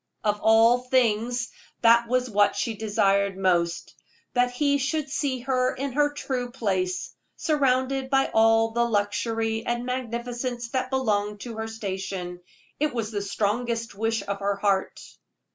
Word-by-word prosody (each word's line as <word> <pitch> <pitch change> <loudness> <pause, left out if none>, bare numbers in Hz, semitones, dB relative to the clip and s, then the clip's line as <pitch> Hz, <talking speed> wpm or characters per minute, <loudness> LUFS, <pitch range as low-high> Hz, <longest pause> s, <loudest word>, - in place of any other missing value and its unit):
Of 210 -1 +1
all 225 +2 +5
things, 245 -1 +1 0.3
that 235 0 +5
was 255 +1 +1
what 205 -3 +3
she 225 +3 -1
desired 200 -2 +1
most, 175 -3 0 0.4
that 245 0 +3
he 285 +3 +1
should 285 +1 -2
see 265 -3 -1
her 255 0 0
in 275 +1 -3
her 290 +2 +2
true 255 -4 -3
place, 190 -7 -2 0.2
surrounded 265 -3 +1
by 270 0 +2
all 225 0 +4
the 235 +1 +1
luxury 225 +1 -1
and 240 0 -2
magnificence 245 -1 -3
that 255 +1 -2
belonged 210 -6 0
to 230 -3 -7
her 220 0 -3
station. 190 -4 -5 0.4
It 300 -2 0
was 225 -2 -2
the 205 -2 -2
strongest 230 +3 -1
wish 225 +1 -1
of 200 0 -3
her 200 0 0
heart. 195 -1 0
230 Hz, 145 wpm, -25 LUFS, 205-255 Hz, 0.4 s, all